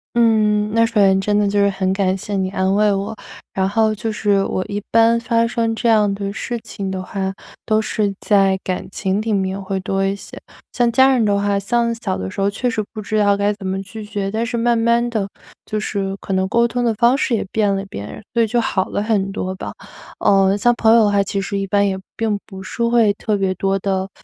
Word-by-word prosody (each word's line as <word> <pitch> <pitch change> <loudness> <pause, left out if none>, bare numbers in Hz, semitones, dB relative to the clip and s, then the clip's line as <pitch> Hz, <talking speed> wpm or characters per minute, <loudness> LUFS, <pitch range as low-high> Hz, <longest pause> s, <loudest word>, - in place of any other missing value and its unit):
嗯， 215 -2 +3
那 230 0 +4
首 230 0 -6
先 195 -2 +5
真 205 +1 +1
的 210 - +2
就 205 0 +1
是 200 - +4
很 190 -1 -1
感 190 -1 +1
谢 205 +2 -5
你 190 -1 0
安 190 0 0
慰 210 0 +3
我。 200 +3 -2 0.4
然 190 0 +1
后 220 +1 +2
就 220 +1 -3
是 205 -2 +1
我 185 - -2
一 205 0 -3
般 230 +1 +4
发 230 0 +1
生 230 -1 -1
这 235 +1 0
样 210 -2 +4
的 200 0 -4
事 240 +1 -4
情 195 -1 -5
的 190 -1 -3
话， 190 0 -3 0.3
都 215 0 +2
是 210 -2 -1
在 195 -2 +3
感 185 -1 -3
情 195 +2 -1
里 225 0 -2
面 190 0 -1
会 190 0 -3
多 195 +1 -1
一 195 +1 0
些。 - - -11 0.3
像 240 -1 +1
家 265 +3 +5
人 245 -3 +2
的 205 -1 +2
话， 200 0 +1
像 235 +3 0
小 200 -5 -3
的 95 - -4
时 - - -8
候 200 - +2
确 245 +5 -2
实 215 -2 -1
不 215 - -5
知 215 +1 -2
道 205 -1 +4
该 205 +1 +1
怎 200 -2 -7
么 190 +1 -2
拒 215 +2 -9
绝， 200 -2 -3
但 225 +2 -1
是 235 0 -3
慢 235 0 +2
慢 235 +1 +2
地 215 -4 -1 0.4
就 215 - -3
是 195 -2 -3
可 195 - -4
能 190 0 +1
沟 235 +3 +2
通 245 +1 -2
的 230 -2 +2
方 235 +4 +4
式 245 - +1
也 - - -1
变 205 -2 +1
了 195 - -3
变， 105 - -8
所 235 - +2
以 225 - +3
就 240 +2 +1
好 190 -4 0
了 205 - -2
很 200 -3 0
多 185 -2 -3
吧。 - - -7 0.5
呃， 195 0 +4
像 240 +3 +3
朋 225 -1 +4
友 230 - +6
的 205 - +2
话， 200 0 +3
其 195 0 -2
实 200 0 -3
一 195 - -3
般 200 +1 +2
也 190 - -1 0.2
并 215 -3 -1
不 190 -2 -10
是 235 +5 -4
会 235 -3 +3
特 210 +1 -2
别 190 -1 0
多 195 +1 0
地 190 0 -1
205 Hz, 265 characters per minute, -19 LUFS, 195-225 Hz, 0.5 s, 友